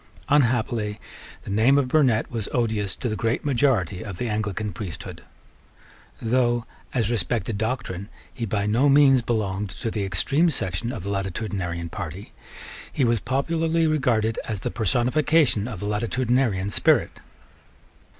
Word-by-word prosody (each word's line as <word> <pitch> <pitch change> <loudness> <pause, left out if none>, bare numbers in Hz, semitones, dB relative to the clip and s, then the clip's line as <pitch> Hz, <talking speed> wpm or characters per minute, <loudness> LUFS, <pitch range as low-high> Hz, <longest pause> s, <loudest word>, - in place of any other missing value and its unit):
Unhappily 115 -6 +1 0.4
the - - -6
name 115 +7 +4
of 140 -2 +2
Burnet 125 -6 +2
was 115 -4 -3
odious 110 -5 0
to 125 - -4
the 110 - -1
great 115 +5 -1
majority 120 - +1
of 95 -5 -7
the 120 - -2
Anglican 105 -1 -2
priesthood. 95 -7 -7 1.0
Though, 120 0 +1 0.3
as 115 -3 0
respected 110 0 -1
doctrine, 110 -4 -3 0.2
he 120 -3 -4
by 100 0 -1
no 120 +7 +3
means 135 -2 +6
belonged 105 -4 -1
to 110 +4 -4
the 105 -2 -2
extreme 135 - +1
section 105 - -2
of 115 -9 -6
the 100 - -3
Latitudinarian 95 -3 -3
party, 95 +7 -6 0.6
he 135 - +1
was 115 -1 +2
popularly 165 +7 0
regarded 120 -8 +1
as 105 -4 -4
the - - -2
personification 125 - +2
of 110 -7 -6
the - - -3
Latitudinarian 115 -1 0
spirit. - - +2
115 Hz, 140 wpm, -24 LUFS, 100-130 Hz, 1.0 s, means